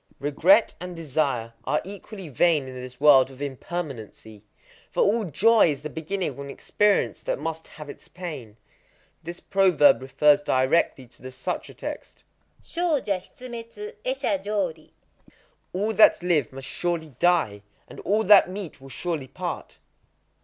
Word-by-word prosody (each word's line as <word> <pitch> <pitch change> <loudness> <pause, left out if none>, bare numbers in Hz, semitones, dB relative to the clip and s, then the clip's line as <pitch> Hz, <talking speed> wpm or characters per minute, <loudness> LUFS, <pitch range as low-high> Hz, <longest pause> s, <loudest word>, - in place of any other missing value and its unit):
Regret 170 +10 +4
and 180 -1 -6
desire 135 -7 -1
are 150 - +1
equally 195 -1 -9
vain 150 0 +2
in 130 - -8
this 125 0 -9
world 140 -3 +6
of 135 -1 -14
impermanency; 135 - -6 0.5
for - - +1
all 215 +2 +2
joy 215 - +4
is 145 -1 -4
the 150 - -5
beginning 175 +4 -3
of 140 - -13
an 140 0 -7
experience 205 +8 +1
that - - -2
must 160 +2 -5
have 150 -1 -11
its - - -11
pain. 145 - -8 0.6
This 170 +2 -7
proverb 175 -9 +4
refers 145 +3 +3
directly 130 0 +1
to 120 - -21
the 130 - -8
sutra 130 0 -5
text,—Shōja 300 - -4
hitsumetsu 245 - -9
é - - -2
sha 295 - 0
jori,—" 190 - -3 0.8
All 205 +4 -1
that 215 -4 +5
live 160 -8 +1
must 135 0 -8
surely 170 -4 -3
die; 165 - +2 0.3
and - - -12
all 210 +3 +1
that 200 -2 +7
meet 185 -7 -7
will 135 - -12
surely 155 0 -4
part." - - -6
160 Hz, 145 wpm, -25 LUFS, 135-195 Hz, 0.8 s, that